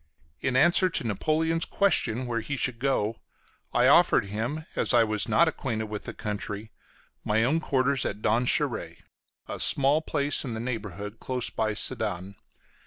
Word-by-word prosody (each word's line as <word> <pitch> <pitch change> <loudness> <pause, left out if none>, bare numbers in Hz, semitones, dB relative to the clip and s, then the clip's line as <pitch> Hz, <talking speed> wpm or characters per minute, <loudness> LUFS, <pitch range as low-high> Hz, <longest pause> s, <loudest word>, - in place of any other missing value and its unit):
In 130 - -1
answer 175 +6 +5
to 165 - -2
Napoleon's 160 - 0
question 130 - +1
where 120 -1 -2
he 140 +5 -4
should 120 -2 -1
go 125 -5 0
to, - - -31 0.6
I - - +5
offered - - +5
him, 115 +10 -4
as - - +1
I 120 - +6
was 105 -1 +1
not 170 - +4
acquainted 110 -8 -3
with 105 -1 -6
the - - -6
country, 105 0 -5 0.5
my 110 +2 +1
own 145 +7 +2
quarters 135 -3 0
at - - -3
Donchéry, 120 +3 0 0.4
a - - -6
small 140 +3 +3
place 145 -2 -1
in 120 -5 -5
the - - -4
neighborhood, 105 -3 -5
close 125 -2 -2
by 110 -1 -1
Sedan. 95 -1 -2
120 Hz, 165 wpm, -27 LUFS, 110-140 Hz, 0.6 s, I